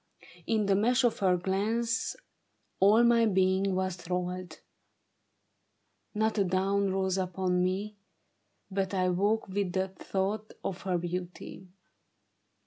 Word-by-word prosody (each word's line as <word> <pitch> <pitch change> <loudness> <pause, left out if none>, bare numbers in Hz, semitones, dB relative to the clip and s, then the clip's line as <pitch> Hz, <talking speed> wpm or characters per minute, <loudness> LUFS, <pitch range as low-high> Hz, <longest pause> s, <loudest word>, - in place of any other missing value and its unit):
In 220 -2 +1
the 200 - +3
mesh 245 +6 +2
of 240 -2 +2
her 185 -3 +3
glance 220 +6 -1 0.6
All 210 +4 +6
my 235 -1 +5
being 190 0 +2
was 185 -1 -1
thralled. 180 +1 -4 1.6
Not 220 0 +1
a - - +4
dawn 195 +2 +1
rose 190 0 0
upon 180 0 0
me 200 +3 -2 0.7
But 195 0 -1
I 185 -1 +2
woke 205 +5 +1
with 190 -1 -2
the 190 0 0
thought 195 +3 -3
of 190 -1 -4
her 185 -2 0
beauty. 180 +2 -6
190 Hz, 125 wpm, -29 LUFS, 185-210 Hz, 1.6 s, All